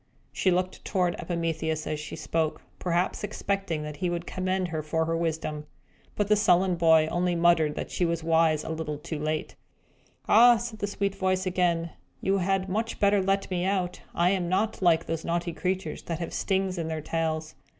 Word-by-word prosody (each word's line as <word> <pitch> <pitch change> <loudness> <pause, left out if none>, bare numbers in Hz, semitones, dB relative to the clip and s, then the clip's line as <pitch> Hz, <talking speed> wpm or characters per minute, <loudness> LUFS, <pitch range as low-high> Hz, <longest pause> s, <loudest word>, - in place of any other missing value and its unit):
She 190 - +1
looked 185 +1 -1
toward 180 -3 0
Epimetheus, 165 -2 -2
as 155 - -3
she 150 - -6
spoke, 160 0 -2 0.2
perhaps 175 +2 0
expecting 195 -6 -2
that 150 -1 -6
he 180 +3 -1
would 170 0 -3
commend 185 0 -1
her 160 -1 -2
for 160 +2 -1
her 165 +1 -1
wisdom. 160 -2 -2 0.5
But 205 - 0
the 210 - +5
sullen 185 -2 +3
boy 160 -2 +5
only 175 0 +1
muttered 165 -3 +3
that - - -5
she - - -1
was 170 -1 0
wise 160 -1 +3
a - - -6
little 160 -2 -3
too 155 +1 -6
late. 155 +1 -2 0.7
"Ah," 240 +2 +7
said 225 -1 -6
the 205 - -1
sweet 200 0 -1
little 195 -1 -2
voice 185 0 +1
again, 175 -2 +1 0.3
"you 195 +1 +1
had 190 +1 0
much 220 +4 -2
better 200 -1 +4
let 195 0 0
me 180 -1 0
out. 185 -2 -1
I 175 +2 +3
am 180 -3 0
not 200 +4 0
like 165 -2 +4
those 165 0 -3
naughty 170 0 -1
creatures 185 -3 -2
that 165 - -4
have 170 0 -5
stings 190 -2 0
in 165 - -2
their 160 -1 -3
tails. 160 0 -2
175 Hz, 195 wpm, -27 LUFS, 160-190 Hz, 0.7 s, Ah